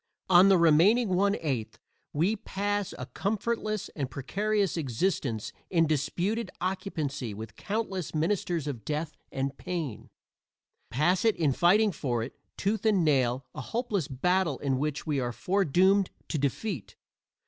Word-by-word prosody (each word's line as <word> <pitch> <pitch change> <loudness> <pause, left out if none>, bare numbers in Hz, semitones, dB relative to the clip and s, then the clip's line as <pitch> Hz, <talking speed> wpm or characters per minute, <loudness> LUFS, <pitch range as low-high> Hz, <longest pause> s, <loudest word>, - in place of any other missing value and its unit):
On 185 +2 +8
the 195 - +6
remaining 175 +8 +5
one 200 +2 +3
eighth 130 -8 -2 0.3
we 175 +9 +1
pass 205 -1 -2
a - - -5
comfortless 215 0 -2
and 140 -4 -4
precarious 200 - 0
existence 130 - -1 0.2
in 165 -3 +3
disputed 170 - -1
occupancy 155 - -3
with 110 +1 -8
countless 195 -6 -3
ministers 170 -1 0
of 130 -7 -4
death 150 +6 -3 0.2
and 135 0 -2
pain 165 -10 -4 0.8
pass 155 +10 +2
it 225 -2 +4
in 150 -5 +2
fighting 200 +8 +4
for 125 -8 -2
it, 120 - -7 0.2
tooth 205 +1 0
and 205 -6 +3
nail, 130 -3 +2
a - - -5
hopeless 210 - -2
battle 175 +2 +1
in 135 -2 -1
which 150 0 -2
we 150 -3 0
are 120 -2 -1
foredoomed 190 - +3 0.2
to 155 - -1
defeat. 140 - -2
170 Hz, 140 wpm, -29 LUFS, 140-200 Hz, 0.8 s, On